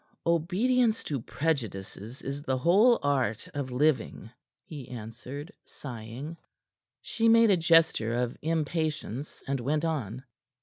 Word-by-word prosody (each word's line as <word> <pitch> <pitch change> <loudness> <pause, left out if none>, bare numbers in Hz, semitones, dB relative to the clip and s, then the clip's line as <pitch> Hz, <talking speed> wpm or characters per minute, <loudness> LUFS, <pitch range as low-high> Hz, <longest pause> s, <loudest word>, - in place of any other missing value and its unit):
"Obedience 215 +8 +2
to 140 -5 -3
prejudices 115 - -3
is 140 +1 -4
the 135 -3 -1
whole 205 - +5
art 130 -7 0
of 140 -2 -3
living," 125 -4 0 0.3
he 145 -6 -9
answered, 125 - -8
sighing. 125 +5 -8 0.7
She 230 0 +1
made 230 -1 +6
a 190 - +4
gesture 165 -9 +3
of 120 0 -1
impatience, 155 -4 -2
and 135 0 -1
went 150 +6 0
on. 130 -7 -3
145 Hz, 120 wpm, -28 LUFS, 125-165 Hz, 0.7 s, made